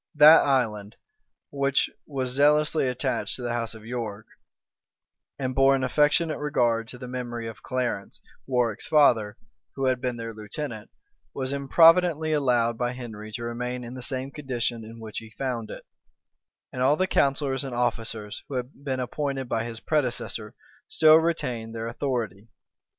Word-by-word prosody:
That 155 +2 +9
island, 110 -6 0 0.6
which 140 -1 +1 0.2
was 130 -3 -2
zealously 150 +2 +3
attached 125 +1 -1
to 125 - -7
the 120 -1 -1
house 115 -1 -3
of 110 -1 -12
York, 115 -3 -5 1.1
and 130 -1 -2
bore 135 +1 +5
an 130 - -1
affectionate 150 +5 +2
regard 120 -6 +1
to 125 - -9
the 125 0 -8
memory 120 -2 -5
of 110 - -9
Clarence, 125 -6 -3 0.3
Warwick's 120 -4 0
father, 115 -9 +4 0.4
who 135 - -1
had 130 -1 +1
been 125 -2 -2
their 115 0 -5
lieutenant, 110 +1 -6 0.5
was 130 0 -2
improvidently 160 +3 +4
allowed 120 -5 +2
by 120 0 0
Henry 110 -4 -8
to 120 - -5
remain 125 +1 -4
in 120 +1 -8
the 130 - -7
same 130 0 -3
condition 120 -5 -3
in 115 +1 -11
which 110 -2 -6
he 115 - -12
found 120 -1 -4
it; - - -9 0.9
and 125 - -4
all 135 +3 +4
the 185 - +1
counsellors 140 -5 +1
and 135 -3 -5
officers, 115 -1 -2
who 140 - -5
had 125 +1 -3
been 130 -2 -2
appointed 135 +1 -3
by 115 -1 -1
his 115 -1 -6
predecessor, 120 -6 -2 0.3
still 155 0 +7
retained 125 -9 -1
their 115 0 -4
authority. 115 -4 -3
125 Hz, 160 wpm, -26 LUFS, 115-140 Hz, 1.1 s, That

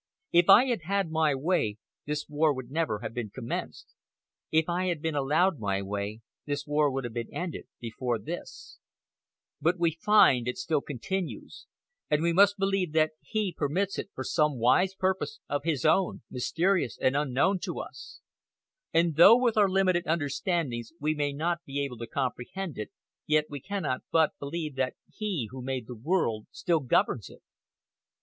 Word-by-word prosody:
If 175 +2 +4
I 225 +6 +9
had 240 -8 -1
had 195 -2 0
my 160 -3 +2
way, 135 - 0 0.3
this 150 0 -2
war 150 0 +2
would 130 -1 -7
never 150 -9 -1
have 115 -1 -5
been 120 -3 -4
commenced. 115 +3 -6 0.6
If 160 0 +3
I 180 +1 0
had 175 -4 -1
been 160 +1 -2
allowed 150 +5 +2
my 100 -2 -1
way, 100 +2 -4 0.3
this 145 0 -2
war 150 0 +2
would 135 0 -3
have 120 -2 -5
been 115 -1 -4
ended 175 -2 -5
before 120 0 -2
this; 105 - -8 0.8
but 175 +3 +2
we 170 -1 +2
find 135 - +5
it 125 - -2
still 165 -6 0
continues, 175 +8 -5 0.4
and 150 +1 +2
we 170 0 +2
must 200 +3 +5
believe 195 -4 0
that 155 0 +3
He 215 -5 -2
permits 180 +7 -1
it - - -5
for - - -4
some 150 -5 +1
wise 180 +11 +3
purpose 190 - -1
of 145 - -1
His 150 -6 0
own, 190 -9 +2
mysterious 170 +5 0
and 130 - +2
unknown 145 +7 +2
to - - -4
us; - - -9 0.7
and 165 -2 +2
though 200 +8 +9
with 245 -3 +1
our 205 -2 +4
limited 185 -2 +2
understandings 150 - -1
we 150 +2 +1
may 145 -1 -1
not 170 +4 -2
be 140 +1 -4
able 125 -4 -7
to 115 - -5
comprehend 140 +8 -3
it, 105 - -4 0.4
yet 155 0 +3
we 145 - -5
cannot 175 -6 -3
but 160 -1 +4
believe 155 +1 -4
that 130 -1 0 0.2
He 190 - -2
who 130 0 -7
made 130 -2 -3
the 125 - -8
world 115 - -1
still 170 -2 0
governs 125 -4 +1
it." - - -16
155 Hz, 175 wpm, -28 LUFS, 130-180 Hz, 0.8 s, I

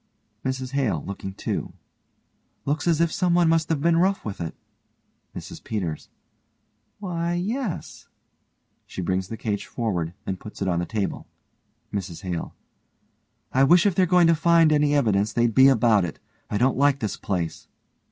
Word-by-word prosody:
MRS 130 -1 -3
HALE: 130 - 0
(looking 95 -1 -6
too) - - -3 0.9
Looks 145 +3 -1
as 165 -2 +3
if 170 -1 +2
someone 175 -1 +2
must 165 -1 +2
have 160 -4 0
been 165 +1 +3
rough 190 +3 +1
with 100 -4 -5
it. 80 - -4 0.8
MRS - - -8
PETERS: 90 -8 -4 0.9
Why, 175 -4 -2
yes. 210 +3 -4 0.8
(She 95 - -5
brings 95 +1 -1
the 115 - -6
cage 105 -2 -3
forward 90 -8 -2
and 95 -1 -3
puts 105 - -10
it 100 - -1
on 85 -2 +1
the 85 - -3
table.) 105 -3 -3 0.7
MRS 95 -3 -5
HALE: 90 -3 -4 1.0
I 130 - +4
wish 170 +6 +5
if 200 - +3
they're 185 +1 +3
going 180 0 +5
to 165 - +5
find 165 0 +4
any 145 -1 +3
evidence 105 -6 +2
they'd 120 -1 +2
be 130 +3 +7
about 115 -6 +4
it. 85 - -4 0.3
I 105 - -1
don't 130 +3 +2
like 140 -1 +4
this 110 -5 -2
place. 90 -5 -3
130 Hz, 160 wpm, -24 LUFS, 100-165 Hz, 1.0 s, be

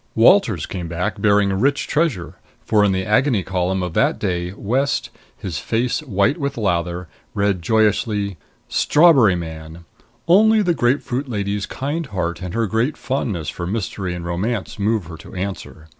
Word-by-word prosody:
Walters - - +4
came 90 -3 -5
back 95 +5 -3
bearing 100 -1 +3
rich 135 +9 +1
treasure, 145 - -1 0.3
for 105 -1 +3
in 100 - +3
the 95 0 -1
Agony 110 -1 +2
Column 95 0 -1
of 90 -2 -4
that - - +2
day 90 0 -2
West, 135 +8 -1 0.3
his 85 -6 -4
face 120 - -1
white 125 - 0
with 140 -1 -3
lather, 90 -4 -1 0.3
read 100 -3 +1
joyously: 105 0 +1 0.3
STRAWBERRY 145 - +5
MAN: 80 0 -8 0.4
Only 215 +4 +5
the 175 -2 +2
grapefruit 130 0 0
lady's 100 -2 -2
kind 150 +4 -3
heart 90 -4 -3
and 90 +2 -5
her 115 0 +1
great 115 +8 0
fondness 110 - -2
for 85 - -5
mystery 95 -3 -3
and 85 -1 -6
romance 100 +5 -3
move 105 -1 0
her 80 0 -9
to - - -13
answer. 95 -4 -6
100 Hz, 160 wpm, -20 LUFS, 90-125 Hz, 0.4 s, STRAWBERRY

